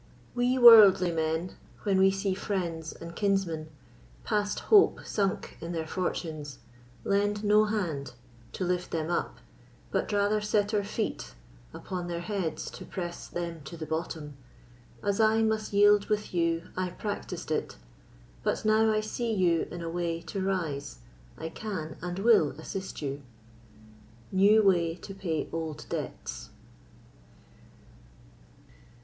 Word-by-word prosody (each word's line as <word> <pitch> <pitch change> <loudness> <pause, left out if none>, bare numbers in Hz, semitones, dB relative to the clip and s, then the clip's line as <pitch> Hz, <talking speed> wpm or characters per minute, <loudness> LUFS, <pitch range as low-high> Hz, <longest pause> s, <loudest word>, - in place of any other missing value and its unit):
We 245 +1 +1
worldly 215 -7 +9
men, 160 +2 -2 0.3
when 195 -3 +2
we 190 0 +6
see 195 0 -1
friends 170 -5 -3
and 170 0 -10
kinsmen 185 -6 0 0.5
Past 205 0 -1
hope 410 -2 +4
sunk 200 -2 -2
in 170 +2 -5
their 165 -1 -2
fortunes, 155 -5 -4 0.5
lend 205 +1 +1
no 210 +1 +5
hand 165 - -2 0.4
To - - -3
lift 180 0 -1
them 160 0 -2
up, - - -2 0.5
but - - -1
rather 205 +1 +2
set 210 0 +1
our 205 -1 +2
feet 200 - -4 0.4
Upon 180 - -5
their 170 -1 -3
heads 180 -3 -3
to - - -9
press 175 -2 -6
them 170 -2 -5
to 170 - -8
the 160 - -5
bottom, 155 -2 -4 0.7
As 200 0 0
I 220 0 +4
must 220 -1 0
yield 205 0 +5
with 210 -2 -1
you 170 -1 0
I 185 0 -1
practised 185 -4 -5
it; 155 - -2 0.6
But - - -1
now 220 +1 +4
I 215 0 +1
see 230 +2 -3
you 180 -5 +2
in 175 -1 -6
a 165 - -3
way 170 -1 -2
to 195 - -5
rise, 165 -7 -2 0.4
I 160 - -5
can 165 -4 -5
and 175 +1 -4
will 200 -8 +4
assist 190 +1 -6
you. 140 0 -3 1.1
New 205 +3 +5
Way 170 -4 +3
to 195 - -9
Pay 170 -6 -2
Old 160 -2 -4
Debts. - - -5
185 Hz, 140 wpm, -29 LUFS, 165-205 Hz, 1.1 s, worldly